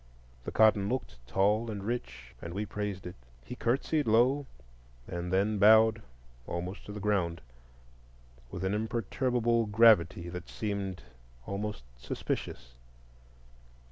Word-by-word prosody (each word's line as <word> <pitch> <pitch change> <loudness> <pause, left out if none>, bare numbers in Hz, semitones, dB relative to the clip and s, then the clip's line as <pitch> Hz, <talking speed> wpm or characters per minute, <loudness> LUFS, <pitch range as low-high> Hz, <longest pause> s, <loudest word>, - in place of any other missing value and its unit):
The - - -4
cotton 105 -2 +4
looked 125 - -3
tall 105 - +2
and 100 -2 -5
rich, 80 - -5
and 85 +1 -7
we 105 +2 -2
praised 105 -2 -4
it. 90 - -6 0.3
He - - -7
curtsied 140 +5 0
low, 130 +6 +3 0.6
and 85 0 -4
then 100 +2 +1
bowed 110 +2 +6 0.5
almost 90 +3 -5
to - - -6
the 105 - -6
ground, 95 -5 0 1.1
with 90 +5 -6
an 95 +1 0
imperturbable 115 +2 0
gravity 105 -6 +4
that 90 0 -7
seemed 100 - -4 0.4
almost 100 - -4
suspicious. - - -5
105 Hz, 120 wpm, -30 LUFS, 90-110 Hz, 1.1 s, bowed